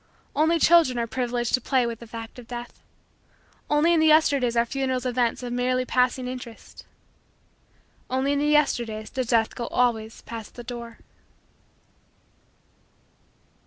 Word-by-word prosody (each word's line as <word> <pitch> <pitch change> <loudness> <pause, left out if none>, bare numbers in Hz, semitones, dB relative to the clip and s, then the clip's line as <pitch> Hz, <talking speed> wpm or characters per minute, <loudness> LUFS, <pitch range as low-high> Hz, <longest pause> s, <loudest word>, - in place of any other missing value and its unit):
Only 320 +3 +3
children 325 -6 +5
are 235 - 0
privileged 240 0 -2
to 255 - +3
play 255 0 +1
with 230 -1 -4
the 235 - -11
fact 225 +1 -9
of 240 - -12
Death. 240 0 -8 0.9
Only 300 +3 +3
in 335 - +3
the 315 - +4
Yesterdays 280 -6 +3
are 235 - +4
funerals 260 0 -2
events 245 -1 0
of 245 -1 -4
merely 255 +1 0
passing 250 0 +1
interest. 250 -2 -9 1.2
Only 265 +2 0
in 285 - 0
the 295 - +1
Yesterdays 235 -8 +1
does 255 -2 -2
Death 225 -2 +2
go 235 - -5
always 225 -3 -1
past 225 -2 -8
the 240 - -8
door. 235 -1 -8
245 Hz, 145 wpm, -25 LUFS, 235-265 Hz, 1.2 s, children